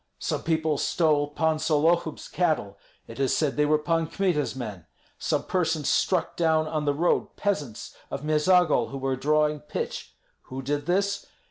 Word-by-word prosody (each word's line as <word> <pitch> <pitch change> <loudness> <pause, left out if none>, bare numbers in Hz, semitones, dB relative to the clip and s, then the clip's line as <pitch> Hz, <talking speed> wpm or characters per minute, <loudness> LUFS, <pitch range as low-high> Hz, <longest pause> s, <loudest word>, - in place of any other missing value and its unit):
Some - - -2
people 160 -2 0
stole 150 -3 +2
Pan 160 +1 0
Sollohub's 160 +1 +1
cattle; 150 - -1 0.3
it 115 - -11
is 135 -2 +2
said 150 -3 0
they 150 0 +2
were 155 +1 +4
Pan 165 +1 0
Kmita's 170 -7 0
men. 105 -10 -7 0.3
Some - - 0
persons 165 -5 0
struck 185 -3 +1
down 160 -2 +2
on 155 -1 -2
the 145 - +2
road 170 +4 +1
peasants 150 - -3
of 140 - -5
Meizagol 155 +2 +3
who 135 - -6
were 135 0 -1
drawing 150 +2 +1
pitch. 150 - -5 0.3
Who 130 +1 -6
did 145 +3 -2
this? 200 +3 0
155 Hz, 160 wpm, -26 LUFS, 145-165 Hz, 0.3 s, were